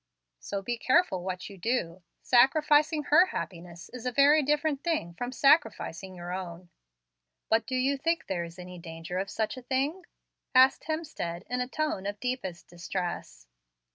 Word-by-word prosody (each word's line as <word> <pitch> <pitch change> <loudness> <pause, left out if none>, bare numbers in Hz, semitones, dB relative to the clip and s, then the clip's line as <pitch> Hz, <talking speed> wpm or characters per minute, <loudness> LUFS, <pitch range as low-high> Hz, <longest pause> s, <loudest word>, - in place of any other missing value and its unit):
So 200 -1 -5
be 240 +2 -3
careful 255 - +2
what 185 0 -4
you 195 -2 -12
do. 185 -5 -1 0.2
Sacrificing 300 +4 +4
her 335 +6 +5
happiness 175 - -6
is 250 0 -7
a - - 0
very 285 +4 +5
different 295 0 0
thing 315 - -1
from 245 +7 -5
sacrificing 220 - +2
your 175 0 -6
own." 175 -1 -7 0.8
"But 225 +1 +2
do 260 - -2
you 270 +2 +1
think 330 +3 0
there 175 -2 -2
is 170 +1 -10
any 180 0 -9
danger 165 +2 -6
of 195 +1 -3
such 220 +5 -2
a - - -7
thing?" 280 +8 -2 0.5
asked 260 +1 +6
Hemstead, 290 - -4
in 250 0 0
a 250 - -2
tone 280 -9 -2
of 205 - -3
the - - -43
deepest 190 -9 -6
distress. 175 - -5
235 Hz, 170 wpm, -29 LUFS, 180-285 Hz, 0.8 s, asked